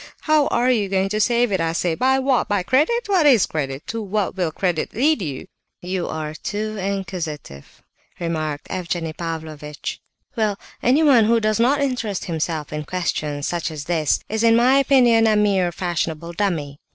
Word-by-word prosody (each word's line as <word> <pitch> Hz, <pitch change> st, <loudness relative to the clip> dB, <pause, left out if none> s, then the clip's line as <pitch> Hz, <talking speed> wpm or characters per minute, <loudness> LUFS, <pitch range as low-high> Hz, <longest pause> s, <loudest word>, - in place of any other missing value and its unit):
How 310 Hz, -2 st, +3 dB
are 245 Hz, +2 st, +2 dB
you 210 Hz, -5 st, +1 dB
going 190 Hz, 0 st, +1 dB
to 215 Hz, +1 st, 0 dB
save 240 Hz, 0 st, +2 dB
it, 190 Hz, -3 st, +1 dB
I 165 Hz, 0 st, 0 dB
say? 170 Hz, 0 st, 0 dB
By 260 Hz, +9 st, +2 dB
what? 265 Hz, -1 st, +1 dB
By 205 Hz, -3 st, 0 dB
credit? 310 Hz, -, +2 dB
What 375 Hz, -7 st, +3 dB
is 245 Hz, -8 st, +6 dB
credit? 140 Hz, -1 st, -4 dB
To 230 Hz, 0 st, -4 dB
what 205 Hz, -1 st, -2 dB
will 180 Hz, -4 st, -1 dB
credit 175 Hz, -1 st, -2 dB
lead 280 Hz, +2 st, +2 dB
you?" 145 Hz, -7 st, -5 dB, 0.3 s
"You 180 Hz, 0 st, -3 dB
are 155 Hz, -1 st, -4 dB
too 215 Hz, +6 st, -4 dB
inquisitive," 180 Hz, -, -5 dB, 0.4 s
remarked 155 Hz, -3 st, -3 dB
Evgenie 170 Hz, -3 st, -3 dB
Pavlovitch. 155 Hz, -3 st, -6 dB, 0.3 s
"Well, 215 Hz, -4 st, 0 dB, 0.2 s
anyone 260 Hz, -3 st, +5 dB
who 230 Hz, +1 st, +3 dB
does 215 Hz, 0 st, 0 dB
not 270 Hz, +5 st, +3 dB
interest 245 Hz, -8 st, -2 dB
himself 160 Hz, -3 st, -3 dB
in 150 Hz, 0 st, -3 dB
questions 150 Hz, -4 st, -2 dB
such 175 Hz, +1 st, -2 dB
as 155 Hz, -2 st, -6 dB
this 160 Hz, -1 st, 0 dB
is, 220 Hz, +1 st, -2 dB
in 230 Hz, 0 st, +5 dB
my 255 Hz, +4 st, +5 dB
opinion, 245 Hz, -5 st, +4 dB
a 215 Hz, -, +3 dB
mere 195 Hz, -4 st, +2 dB
fashionable 170 Hz, -2 st, -3 dB
dummy." 160 Hz, -7 st, -2 dB
190 Hz, 175 wpm, -21 LUFS, 160-235 Hz, 0.4 s, is